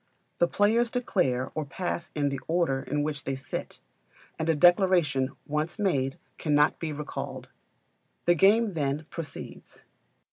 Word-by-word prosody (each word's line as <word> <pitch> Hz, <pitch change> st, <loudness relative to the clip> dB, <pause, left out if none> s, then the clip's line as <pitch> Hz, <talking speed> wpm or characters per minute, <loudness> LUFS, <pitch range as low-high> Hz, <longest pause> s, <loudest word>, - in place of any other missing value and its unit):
The 175 Hz, -, +4 dB
players 225 Hz, +6 st, +2 dB
declare 175 Hz, -, 0 dB
or 155 Hz, -, -2 dB
pass 170 Hz, +4 st, -4 dB
in 145 Hz, -2 st, +1 dB
the 140 Hz, -1 st, -3 dB
order 165 Hz, -6 st, +1 dB
in 145 Hz, +1 st, -1 dB
which 145 Hz, -2 st, -3 dB
they 135 Hz, -, -2 dB
sit; 135 Hz, -, -6 dB, 0.6 s
and 160 Hz, +1 st, -1 dB
a 165 Hz, -, +4 dB
declaration 175 Hz, -5 st, +4 dB, 0.2 s
once 150 Hz, +5 st, -2 dB
made 140 Hz, -11 st, 0 dB, 0.2 s
cannot 150 Hz, -1 st, +3 dB
be 160 Hz, -2 st, -3 dB
recalled. 150 Hz, 0 st, -6 dB, 0.7 s
The 175 Hz, -, +6 dB
game 205 Hz, +5 st, +4 dB
then, 150 Hz, -1 st, -1 dB
proceeds. 165 Hz, -4 st, -8 dB
155 Hz, 140 wpm, -28 LUFS, 145-180 Hz, 0.7 s, The